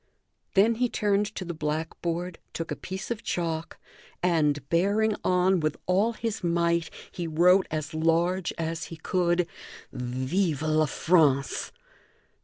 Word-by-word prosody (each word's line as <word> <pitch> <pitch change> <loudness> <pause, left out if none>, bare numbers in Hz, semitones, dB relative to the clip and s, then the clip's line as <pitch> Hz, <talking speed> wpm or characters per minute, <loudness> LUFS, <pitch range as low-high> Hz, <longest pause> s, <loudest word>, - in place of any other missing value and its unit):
Then 210 +4 +5
he 250 - +3
turned 205 -1 +1
to 185 - -4
the 175 - -4
blackboard, 165 +3 -3
took 165 - -4
a - - -1
piece 190 +5 -6
of 230 -2 -2
chalk, 165 -5 -3 0.5
and, 150 -5 +2
bearing 205 +6 +2
on 180 0 +3
with 155 -1 -1
all 200 +6 +2
his 225 -3 -4
might, 170 -1 +1 0.2
he 175 -2 -4
wrote 180 +4 +4
as 155 0 -4
large 165 +3 +1
as 165 0 -3
he 165 - -8
could: 175 +1 +1 0.5
"Vive 130 +6 -1
La 155 0 +2
France!" 145 -3 +2
170 Hz, 135 wpm, -27 LUFS, 155-185 Hz, 0.5 s, Then